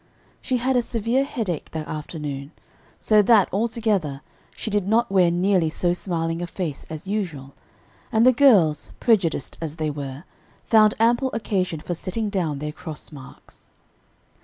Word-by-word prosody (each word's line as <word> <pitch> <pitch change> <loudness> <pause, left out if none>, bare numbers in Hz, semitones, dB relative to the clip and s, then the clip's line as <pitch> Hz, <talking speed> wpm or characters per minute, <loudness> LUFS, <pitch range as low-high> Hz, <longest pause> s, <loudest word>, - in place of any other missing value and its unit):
She 255 - 0
had 255 +2 0
a 245 - +4
severe 235 +3 0
headache 225 - -4
that 155 -1 -4
afternoon, 150 -2 -6 0.5
so 215 -1 +4
that, 205 -2 +5
altogether, 205 -9 0 0.3
she 220 - -5
did 205 -2 0
not 225 +1 +2
wear 185 -3 +4
nearly 175 -1 +2
so 175 +2 0
smiling 165 -2 -2
a 175 - -3
face 165 -5 -5
as 160 +1 -7
usual; 170 -10 -4 0.6
and 225 +1 +4
the 255 - +8
girls, 200 - +4
prejudiced 185 - +1
as 160 -2 -4
they 155 -2 -2
were, 140 0 -6 0.4
found 215 -2 +5
ample 240 +4 +3
occasion 185 -7 -1
for 175 - -4
setting 200 +5 -3
down 170 -7 -1
their 150 +2 -4
cross 160 -1 -9
marks. 135 -3 -14
185 Hz, 155 wpm, -23 LUFS, 155-220 Hz, 0.6 s, the